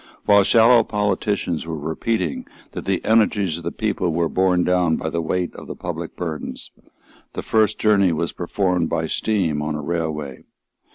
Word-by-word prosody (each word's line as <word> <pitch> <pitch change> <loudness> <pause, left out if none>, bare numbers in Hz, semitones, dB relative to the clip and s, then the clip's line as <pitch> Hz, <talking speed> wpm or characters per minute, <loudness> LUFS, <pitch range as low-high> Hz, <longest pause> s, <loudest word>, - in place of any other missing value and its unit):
While 100 -1 +6
shallow 115 +3 +5
politicians 105 -5 -1
were 80 -1 -4
repeating 80 +4 -2 0.2
that - - -7
the 95 -2 -1
energies 105 -6 +2
of - - -12
the 85 - -3
people 100 -5 -1
were 85 0 0
borne 90 -1 +2
down 90 -3 +2
by 80 - -3
the 85 - -1
weight 90 +2 -2
of - - -11
the - - -6
public - - -6
burdens, 80 -3 -6 0.6
the - - -5
first 110 -1 +2
journey 100 -4 +3
was 85 +1 -1
performed 90 -1 -1
by 80 -1 -1
steam 85 -4 0
on 75 0 -2
a 75 - -4
railway. 75 -5 -4
90 Hz, 170 wpm, -21 LUFS, 80-105 Hz, 0.6 s, While